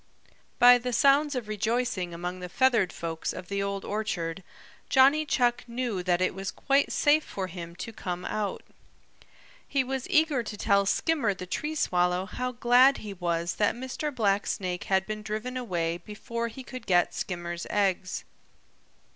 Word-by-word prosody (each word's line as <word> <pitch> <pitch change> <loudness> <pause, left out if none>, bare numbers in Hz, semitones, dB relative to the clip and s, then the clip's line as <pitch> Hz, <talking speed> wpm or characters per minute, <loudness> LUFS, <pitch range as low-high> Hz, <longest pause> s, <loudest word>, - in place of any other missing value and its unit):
By 245 0 +8
the 250 0 -3
sounds 280 +4 +4
of 245 -4 -3
rejoicing 215 -3 -1
among 175 +2 -5
the 180 0 -6
feathered 230 -5 +3
folks 165 -1 -4
of 180 -1 -8
the 200 0 -1
Old 200 0 -3
Orchard 195 -5 -3 0.5
Johnny 280 +3 +5
Chuck 245 -3 +2
knew 235 -5 -2
that 180 0 +1
it 185 - +1
was 195 0 -4
quite 275 0 +1
safe 300 +1 +3
for 195 - -4
him 170 -2 -8
to 225 +5 -7
come 180 -3 -5
out. 210 -2 -3 1.0
He 275 -2 +1
was 265 +4 -4
eager 315 -7 +3
to 210 -2 -7
tell 200 0 +2
Skimmer 235 -3 +1
the 180 - -7
Tree 300 +12 -3
Swallow 180 -7 +1
how 250 +5 -3
glad 250 +3 +5
he 210 -2 -7
was 170 -2 -2
that 210 +1 +2
Mr. 260 +4 -4
Blacksnake 195 -6 -1
had 190 0 +2
been 215 +1 -5
driven 215 +4 -4
away 175 -9 -1
before 235 +3 -5
he 245 +3 -9
could 255 0 -9
get 175 -2 +3
Skimmer's 175 -1 -4
eggs. 190 -2 0
210 Hz, 165 wpm, -28 LUFS, 180-250 Hz, 1.0 s, By